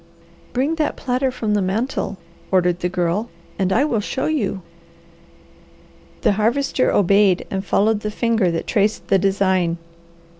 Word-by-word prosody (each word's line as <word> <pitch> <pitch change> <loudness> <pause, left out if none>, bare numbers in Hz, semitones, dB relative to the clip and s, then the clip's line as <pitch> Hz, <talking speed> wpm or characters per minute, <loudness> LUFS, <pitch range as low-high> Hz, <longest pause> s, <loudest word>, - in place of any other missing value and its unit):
"Bring 265 +6 0
that 310 - 0
platter 260 +1 -1
from 225 -4 -2
the 205 - +2
mantel," 200 +1 -2 0.3
ordered 180 -2 +2
the 180 - -1
Girl, 180 +5 -1 0.3
"and 190 -1 +1
I 245 +9 +3
will 240 -8 0
show 260 +5 -3
you." 205 - -1 1.6
The - - +3
Harvester 240 +6 +1
obeyed 200 -1 +3
and 190 0 -2
followed 210 +2 +2
the 210 - -3
finger 225 -3 +1
that 165 -1 -2
traced 210 -1 0
the 195 - +4
design. 190 -3 +1
205 Hz, 145 wpm, -20 LUFS, 190-235 Hz, 1.6 s, the